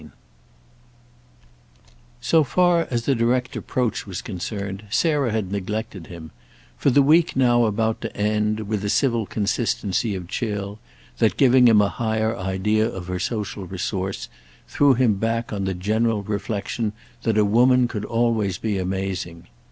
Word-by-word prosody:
II 75 - -13 2.1
So 160 -2 +3
far 175 +3 +2
as 120 -2 -2
a 140 - +4
direct 125 +1 0
approach 125 -4 -2
was 90 -3 -5
concerned 100 +1 -5
Sarah 145 0 +1
had 105 -4 -2
neglected 100 -2 -4
him, 80 -3 -10 0.4
for - - +1
the 140 +2 +5
week 165 +4 +4
now 120 -2 +4
about 110 +1 0
to 115 - -6
end, 105 +1 0
with 105 -1 -3
a 105 - -1
civil 115 -3 +1
consistency 105 0 -1
of 90 -2 -6
chill 105 -1 -4 0.4
that, 110 -4 +2
giving 125 -2 +6
him 105 -3 +6
a 100 - +1
higher 110 0 -1
idea 105 +3 0
of 90 -1 -7
her 90 0 -2
social 100 -1 -3
resource, 95 +1 -3 0.4
threw 140 -2 +3
him 115 -5 +2
back 115 +2 -2
on 100 -2 -2
the 95 -1 -2
general 110 +3 0
reflexion 105 +1 -3 0.3
that 110 -2 0
a 105 - +4
woman 125 +4 +4
could 105 -3 -5
always 115 -5 0
be 105 -2 -2
amazing. 95 -2 -4
110 Hz, 150 wpm, -23 LUFS, 100-120 Hz, 2.1 s, giving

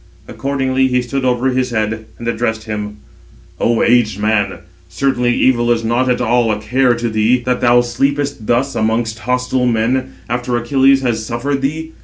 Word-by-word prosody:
Accordingly 135 -1 0
he 125 -1 0
stood 135 +2 -3
over 125 +1 +1
his 130 0 0
head, 110 -1 -2
and 115 - -7
addressed 115 -1 -1
him: 105 -1 -5 0.6
"O 115 -1 +2
aged 115 -4 +2
man, 105 -2 0 0.3
certainly 125 +5 0
evil 120 -2 +2
is 115 -1 +1
not 120 +3 +1
at 125 - +1
all 120 -1 +2
a 105 - -2
care 125 +3 +2
to 120 0 -2
thee, 110 +3 +2
that 125 +1 -1
thou 120 0 +5
sleepest 140 0 -2
thus 130 +3 +1
amongst 110 0 -1
hostile 125 +1 0
men, 125 +3 0
after 120 0 -1
Achilles 135 +3 +3
has 115 -3 -1
suffered 130 +5 -2
thee. 160 +4 -3
120 Hz, 170 wpm, -16 LUFS, 110-130 Hz, 0.6 s, thou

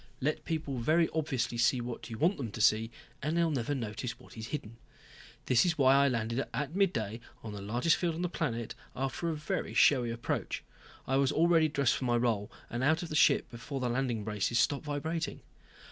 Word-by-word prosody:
Let 150 +3 -1
people 155 -5 -2
very 160 +7 +3
obviously 135 -7 -1
see 120 +2 +3
what 120 +1 -6
you 115 - -6
want 175 - +2
them 125 -5 -4
to - - -6
see, 110 +1 +4 0.3
then 155 +3 -1
they'll 170 -1 +2
never 140 0 -1
notice 120 0 -4
what - - -15
is 110 0 -6
hidden. 115 -5 -6 0.7
This 125 -2 +4
was 170 -3 +1
why 135 -2 +6
I 140 0 +5
landed 115 0 0
at 145 +5 -3
midday, 115 - 0 0.2
on 110 -2 -6
the 100 - -6
largest 120 +11 +2
field 170 -3 -1
on 170 - -3
the - - +1
planet, 125 -10 -3 0.2
after 135 +6 -2
a 160 - -1
very 150 0 -3
showy 125 -5 +5
approach. 115 0 -3 0.4
I 135 - +1
was 140 0 +3
already 165 -1 +4
dressed 140 -4 +2
for 130 - -3
my 120 -1 +2
role, 115 -4 0 0.2
and 120 +2 -3
out 160 +5 +3
of 170 - -6
the 155 - -4
ship - - +4
before 125 +3 -5
the 125 -1 -1
landing 120 -3 -1
braces 105 +2 -1
stopped 140 +5 +2
vibrating. 160 +3 -3
135 Hz, 205 wpm, -31 LUFS, 115-155 Hz, 0.7 s, why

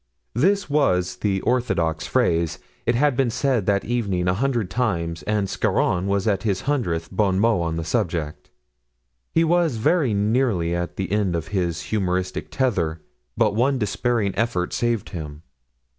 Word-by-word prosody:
This 195 - +2
was 135 -12 +1
the 95 -2 0
orthodox 85 -11 0
phrase. 85 -1 +1 0.3
It 120 - +3
had 145 +1 +3
been 130 -1 +2
said 120 -3 0
that 100 -1 +2
evening 100 -7 -1
a 90 - +3
hundred 120 -3 -1
times—and 95 -2 -1
Scarron 90 0 0
was 100 +1 0
at 100 -2 +1
his 100 -4 -1
hundredth 90 - -1
bon 95 -1 +1
mot 110 -3 +3
on 85 -1 -1
the 80 - -2
subject; 80 -2 -2 0.8
he 165 - +3
was 165 -4 +2
very 125 - +2
nearly 105 -5 +1
at 85 0 -3
the 95 -1 -3
end 100 -4 +1
of 85 +3 -4
his 90 -4 -1
humoristic 95 -2 -1
tether, 90 -12 0 0.4
but 105 -3 +3
one 130 +5 +2
despairing 110 -1 0
effort 95 -5 -1
saved 120 -3 -1
him. 75 -2 -7
100 Hz, 155 wpm, -23 LUFS, 90-120 Hz, 0.8 s, It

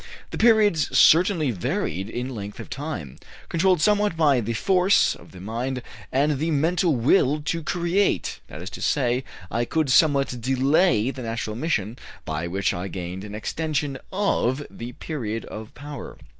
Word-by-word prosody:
The - - -5
periods 215 -9 +4
certainly 165 -4 +5
varied 95 -1 -2
in 125 +3 -4
length 105 -2 -7
of - - -9
time, 135 - -5 0.3
controlled 180 0 +2
somewhat 205 -2 +2
by 145 -6 +4
the 115 +1 -2
force 190 - +3
of - - -15
the 90 - -12
mind 120 +6 -3 0.3
and 140 +1 +1
the 160 +3 0
mental 165 +2 +2
will 135 +4 +3
to 165 +2 -1
create; 175 +5 0
that 80 - -9
is 95 - -7
to - - -8
say, 125 -2 +1 0.3
I 115 +1 0
could 155 +2 0
somewhat 140 -4 +3
delay 135 - +2
the 135 - -8
natural 115 -2 -3
emission, 120 - -2 0.3
by 80 +2 -3
which 95 +3 0
I 90 +2 -4
gained 90 0 -6
an 105 0 -7
extension 145 +3 -2
of 145 -9 0
the 120 +1 -8
period 115 -9 -4
of 110 0 -8
power." 145 -1 -8
135 Hz, 160 wpm, -24 LUFS, 110-160 Hz, 0.3 s, certainly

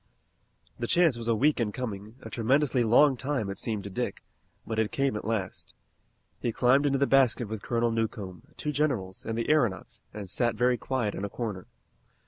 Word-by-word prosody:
The 120 - -2
chance 170 -4 +4
was 115 -1 -5
a 115 - +3
week 145 +6 +2
in 110 -3 0
coming, 105 -2 -6
a - - -8
tremendously 130 +2 +2
long 130 +5 +5
time 130 -6 -2
it 100 - -6
seemed 110 -4 -2
to 100 - -6
Dick, - - -3 0.4
but 110 -1 -2
it 110 -1 +1
came 135 -4 0
at 105 - -5
last. 110 -4 -3 0.6
He 120 - -1
climbed 130 +5 +3
into 135 -1 +2
the 140 - +3
basket 130 -4 +3
with 110 0 -5
Colonel 120 +1 0
Newcomb, 110 -5 -3 0.2
two 150 - -2
generals, 125 -12 -1
and 115 0 -2
the 115 - -1
aeronauts 120 - +1
and 105 -2 -7
sat 120 +5 0
very 125 +3 +3
quiet 120 -5 -1
in 95 - -5
a 100 - -2
corner. 105 -5 -5
115 Hz, 195 wpm, -28 LUFS, 105-130 Hz, 0.6 s, long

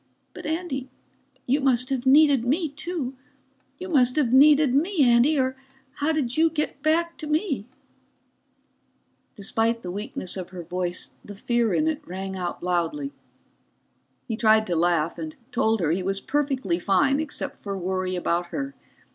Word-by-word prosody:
But - - -8
Andy, 310 -5 -3 0.6
you 275 +4 +1
must 255 -1 +1
have 265 -1 -1
needed 285 -2 +6
me, 305 +7 0
too. 295 -2 -4 0.6
You 370 - -7
must 255 -6 +3
have 270 -6 +1
needed 290 0 +6
me, 325 +3 +2
Andy, 245 +5 +4
or 260 -1 +1 0.4
how 295 +2 +1
did 275 -6 -1
you 325 +1 +4
get 300 -3 -3
back 335 +3 +1
to 310 - -6
me?" 300 - -1 1.7
Despite 225 +3 0
the 180 - -4
weakness 195 -1 -4
of 185 -2 -6
her 180 -2 -8
voice, 180 +1 -3
the 205 - -10
fear 235 +1 0
in 310 - +2
it 315 -1 -1
rang 190 +1 -5
out 180 -2 -4
loudly. 180 - -1 1.1
He 225 - -2
tried 220 -1 +4
to 175 - -1
laugh 170 -1 +1
and 160 -1 -6 0.2
told 225 -3 +1
her 160 -2 +1
he 180 +3 0
was 195 +1 -1
perfectly 265 - -1
fine, 270 +10 +2
except 310 -2 -4
for 200 -1 -5
worry 185 0 -2
about 175 0 -1
her. 275 +8 -4
250 Hz, 160 wpm, -25 LUFS, 190-295 Hz, 1.7 s, needed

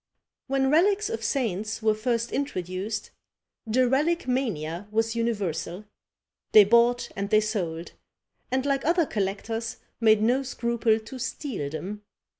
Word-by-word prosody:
When 270 0 +1
relics 395 +6 +3
of 225 0 -4
saints 220 -2 -1
were 220 -1 +4
first 230 +2 -1
introduced, 205 -5 -3 0.6
the 250 +3 +3
relique 300 +5 +1
mania 200 - -2
was 225 +1 0
universal; 205 -5 -2 0.7
they 215 - +10
bought 235 +3 +3
and 200 +1 -3
they 215 0 +5
sold, 180 -6 -3 0.6
and, 260 +1 0
like 275 -1 +1
other 335 +1 +3
collectors, 225 +2 -3 0.2
made 215 -2 +4
no 250 +4 +3
scruple 235 -3 0
to 225 +4 -10
steal 245 - -4
them. 185 +8 -6
225 Hz, 130 wpm, -26 LUFS, 205-255 Hz, 0.7 s, they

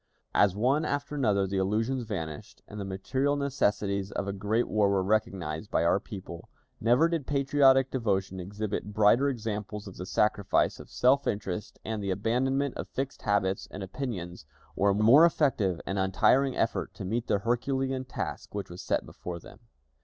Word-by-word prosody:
As 100 -2 +4
one 130 +8 +2
after 145 -1 -2
another 105 -9 +2
the 95 +1 -2
illusions 115 +6 0
vanished, 80 -8 -6
and 105 - -8
the - - -3
material 130 +9 -1
necessities 105 -8 0
of 100 - -3
a 100 - -2
great 105 +4 0
war 105 -2 +2
were 100 -1 +2
recognized 95 -4 -1
by - - +1
our 85 +3 +3
people, 95 -5 -9 0.3
never 120 +8 +4
did 165 -5 -2
patriotic 135 -2 +4
devotion 100 -6 -1
exhibit 105 +2 -4
brighter 110 +7 +4
examples 105 -4 -4
of 95 - -10
the 90 - -6
sacrifice 105 0 +1
of - - -11
self 135 +3 +3
interest 100 -1 -3
and 110 -1 -3
the 100 - -2
abandonment 125 +7 0
of - - -5
fixed 135 +1 -4
habits 100 -2 0
and 95 - -7
opinions, 95 - -5 0.3
or 100 0 +3
more 115 +9 +7
effective 130 - +2
and 95 0 -2
untiring 125 +8 +3
effort - - -1
to - - -6
meet 115 +5 -2
the - - +2
herculean 130 +4 -1
task 130 - -6
which 100 -3 -4
was 90 - -8
set - - -1
before 90 -1 -7
them. - - -14
105 Hz, 170 wpm, -28 LUFS, 95-130 Hz, 0.3 s, more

